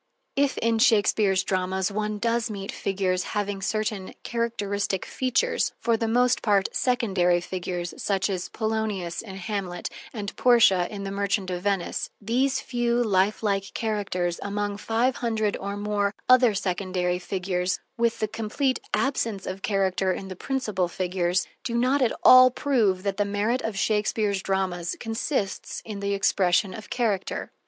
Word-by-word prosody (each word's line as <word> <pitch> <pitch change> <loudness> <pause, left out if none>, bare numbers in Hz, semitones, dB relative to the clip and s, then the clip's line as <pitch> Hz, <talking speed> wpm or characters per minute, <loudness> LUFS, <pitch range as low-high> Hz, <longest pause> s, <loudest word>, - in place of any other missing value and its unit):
If 280 -1 +1
in 230 0 +1
Shakespeare's 205 -5 +3
dramas 190 0 -1
one 210 +1 -2
does 235 +2 0
meet 200 -2 -5
figures 185 -2 -1 0.2
having 205 -1 -2
certain 210 -1 -2
characteristic 205 -5 -2
features, 265 - 0
for 235 -1 +1
the 225 0 -1
most 245 +2 +3
part 200 -3 +3
secondary 195 -9 +2
figures, 175 -1 -4
such 195 -2 +1
as 185 -3 -3
Polonius 215 -6 -2
in 195 -4 -9
"Hamlet" 190 -2 -4 0.2
and 205 -4 -5
Portia 225 -8 +5
in 200 -2 -6
"The 195 - -4
Merchant 200 -1 -1
of 180 -1 -3
Venice," 195 -2 -1
these 255 +5 +1
few 240 -1 0
lifelike 200 -1 +1
characters 195 -6 -1
among 205 0 -2
five 230 +4 0
hundred 220 -3 0
or 200 +1 -4
more 205 -1 -1
other 250 -4 +6
secondary 185 -2 -1
figures, 180 -1 -2 0.2
with 230 -1 +1
the 215 - 0
complete 225 +5 -1 0.2
absence 230 -7 -1
of 190 +1 -5
character 190 -2 +1
in 190 +1 -5
the 185 - -6
principal 215 -6 -1
figures, 180 0 0 0.2
do 235 - -3
not 255 +4 +2
at 245 - +1
all 255 0 +9
prove 230 -9 +1
that 200 -1 -1
the 205 - +3
merit 205 +5 0
of 220 -3 -3
Shakespeare's 210 -1 +1
dramas 185 -3 -1
consists 225 -2 -2
in 210 -3 -6
the 200 0 -1
expression 190 0 +2
of 215 +2 -9
character. 215 -6 -1
205 Hz, 150 wpm, -25 LUFS, 190-225 Hz, 0.2 s, all